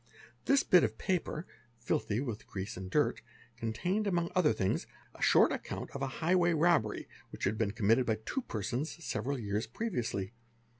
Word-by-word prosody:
This 275 0 +4
bit 180 -2 +6
of - - 0
paper, 180 -3 -1 0.3
filthy 110 -2 -1
with 120 -5 -4
ease 95 +3 -3
and 95 0 -6
dirt, - - +1 0.3
contained 180 - -1
among 175 -3 0
other 180 -4 +4
things 95 -4 0 0.3
a - - -15
short - - +6
account - - -4
of - - -6
a 135 - 0 0.2
high 175 +3 +3
y 175 -1 +4
robbery 160 -10 +2 0.2
which - - -9
had 100 +3 +2
been 110 -1 0
committed 115 +3 +2
by 110 - +3
two 265 - -1
persons 125 - -4
several 135 +6 -2
years 105 0 -2
sviously. 120 - -2
125 Hz, 170 wpm, -32 LUFS, 110-175 Hz, 0.3 s, bit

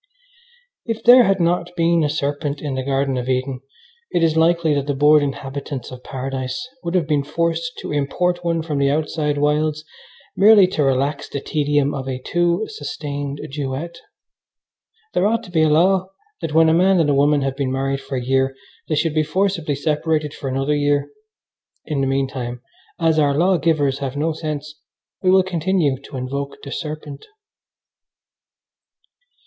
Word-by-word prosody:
If 225 -2 -4
there 245 0 +8
had 195 0 +2
not 175 +1 0
been 170 -1 +3
a 150 - +1
serpent 145 -1 -2
in 145 -3 -4
the 130 - -2
Garden 135 0 0
of 125 +1 -3
Eden 130 0 -1 0.5
it 170 - +1
is 160 -1 +2
likely 165 -1 +3
that 140 -1 -1
the 145 - 0
bored 150 +2 +5
inhabitants 140 -1 -5
of 125 0 -10
Paradise 130 - -4
would 170 +2 -3
have 175 -4 +2
been 150 -2 +1
forced 170 - -1
to - - -6
import 175 +5 0
one 165 -1 0
from 150 -3 -2
the 140 0 +3
outside 150 0 -1
wilds 150 +1 0 0.5
merely 205 -1 +7
to 155 - -1
relax 140 +2 0
the 140 - -3
tedium 145 -1 0
of 135 -1 -4
a 130 - -2
too 175 +8 0
sustained 145 -4 -5
duet. 145 +4 -4 1.1
There 190 - +2
ought 230 +2 0
to 190 - -12
be 160 -2 +2
a 155 - +4
law 185 +4 +3 0.3
that 155 - -3
when 160 0 +6
a 160 - +4
man 185 +2 +4
and 150 -3 +3
a - - +3
woman 145 +1 +3
have 135 -1 -2
been 135 -2 -2
married 135 +1 -1
for 135 - -6
a 125 -1 -3
year 135 +1 +1 0.3
they 155 - +1
should 155 +1 0
be 155 - +2
forcibly 165 -1 0
separated 150 +1 -1
for 135 - -5
another 135 +3 0
year. 145 -1 +1 0.7
In 145 -3 -2
the 135 - +1
meantime, 130 -2 -2 0.4
as 165 -2 +2
our 145 -2 +2
law 180 +3 +3
givers 145 -4 +1
have 140 0 -4
no 160 +2 0
sense, 150 -1 -5 0.4
we 185 - +2
will 190 0 +5
continue 170 -6 0
to 135 - -8
invoke 140 +2 -4
the 140 - -8
serpent. 150 -2 -6
150 Hz, 175 wpm, -20 LUFS, 140-165 Hz, 1.1 s, there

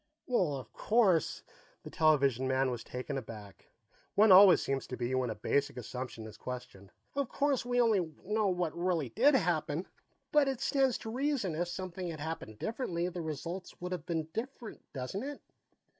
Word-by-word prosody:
"Well, 185 - +1
of 130 - -8
course 205 -8 +2 0.2
" - - -32
The - - -9
television 140 -5 +3
man 130 0 +2
was 120 -2 -5
taken 130 +2 -4
aback; 105 -4 -11 0.5
one 215 0 +6
always 190 0 +9
seems 135 0 -2
to 125 - -5
be 120 +2 -2
when 130 -2 +1
a 110 - -3
basic 140 +6 0
assumption 125 -1 -6
is 110 - -10
questioned. 120 -6 -8 0.2
"Of 280 -3 -1
course, 280 -4 0
we 245 0 +1
only 205 -9 +3
know 210 +1 +1
what 180 -4 -1
really 170 -6 0
did 270 - +4
happen, 170 - 0 0.4
but 295 -2 +5
it 265 -3 -1
stands 270 -3 +2
to 220 - -6
reason 255 - 0
if 170 +3 -1
something 185 0 -5
had 160 -2 -5
happened 145 -9 -5
differently, 180 - -2
the 180 -1 -5
results 165 +4 -5
would 180 +1 -5
have 180 -3 -4
been 160 -3 -1
different, 240 -1 -6
doesn't 135 +9 -4
it?" 285 +2 -5
170 Hz, 180 wpm, -32 LUFS, 130-220 Hz, 0.5 s, always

